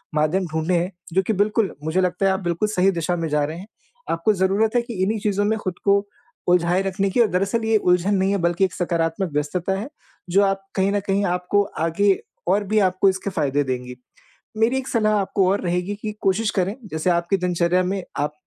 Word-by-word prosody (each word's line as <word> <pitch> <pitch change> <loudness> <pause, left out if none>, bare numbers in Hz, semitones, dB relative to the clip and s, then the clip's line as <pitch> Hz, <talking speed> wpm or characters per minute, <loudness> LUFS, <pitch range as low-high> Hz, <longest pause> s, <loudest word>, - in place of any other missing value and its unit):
माध्यम 155 +5 +1
ढूँढे 160 +3 0
हैं, 175 +2 0 0.2
जो 190 - +4
कि 205 +4 -1
बिल्कुल 210 +1 +1
मुझे 160 +4 +1
लगता 180 +1 0
है 195 - +4
आप 190 - -2
बिल्कुल 175 +2 -1
सही 190 -1 +3
दिशा 175 0 -1
में 165 -1 -2
जा 150 0 +1
रहे 155 +3 -6
हैं। 190 - -10 0.4
आपको 165 +6 +1
ज़रूरत 195 +3 +1
है 240 - +4
कि 235 0 -8
इन्हीं 215 +3 0
चीज़ों 205 0 0
में 220 +1 +1
ख़ुद 185 -4 -3
को 200 0 +3 0.4
उलझाए 180 +1 +3
रखने 195 0 -1
की 235 +5 +3
दरअसल 200 +3 0
ये 220 0 +3
उलझन 180 0 +2
नहीं 190 0 +1
है 200 - +1
बल्कि 175 +3 +2
एक 185 - -5
सकारात्मक 170 0 -1
व्यस्तता 170 +6 -1
है। 225 +7 -6 0.4
जो 195 +3 +4
आप 195 0 0
कहीं 195 +1 +2
न 205 - +1
कहीं 200 +1 +1
आपको 180 +2 +1 0.2
आगे 165 +5 +3 0.3
और 200 +3 +2
भी 215 +2 +1
आपको 185 +2 +2
इसके 190 +1 -2
फ़ायदे 145 -5 0
देंगी। 125 -1 -4 0.6
मेरी 225 +4 +2
एक 265 0 -5
सलाह 215 -4 +2
आपको 190 -1 +1
और 200 +2 +1
रहेगी 180 +3 -1
कि 215 -1 -3
कोशिश 200 +3 +1
करें 190 +3 +1 0.2
जैसे 160 +3 0
आपकी 170 +3 +1
दिनचर्या 180 0 +1
में 190 +1 -2 0.2
आप 145 +1 0
190 Hz, 215 wpm, -22 LUFS, 175-200 Hz, 0.6 s, जो